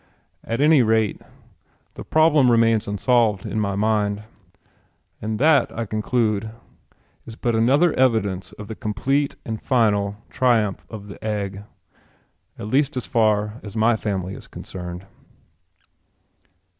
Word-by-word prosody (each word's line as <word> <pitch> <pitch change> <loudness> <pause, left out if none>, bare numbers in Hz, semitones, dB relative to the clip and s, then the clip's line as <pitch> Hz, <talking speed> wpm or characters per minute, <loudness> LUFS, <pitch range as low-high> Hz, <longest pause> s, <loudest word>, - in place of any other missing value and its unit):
At 115 +4 -2
any 150 -2 +6
rate, 110 -2 +1 0.7
the - - -8
problem 155 -4 +4
remains 115 -2 +3
unsolved 105 -1 +1
in 110 - -2
my 100 -2 -1
mind. 105 0 0 1.0
And 110 0 -3
that, 145 -1 +4
I 115 - -2
conclude, 110 0 -1 0.8
is 115 - -8
but 120 0 -1
another 135 +9 +3
evidence 110 -7 +1
of 105 - -10
the 110 - -5
complete 135 +7 -1
and 110 -1 -5
final 105 -5 +1 0.2
triumph 115 -6 +1
of 105 -2 -9
the 100 - -11
egg 100 -2 -3 0.9
at - - -7
least 140 +5 +1
as 125 - -3
far 110 -1 +1
as 105 0 -10
my 115 +1 +3
family 95 -4 -3
is - - -11
concerned. 90 0 -8
110 Hz, 130 wpm, -22 LUFS, 105-120 Hz, 1.0 s, any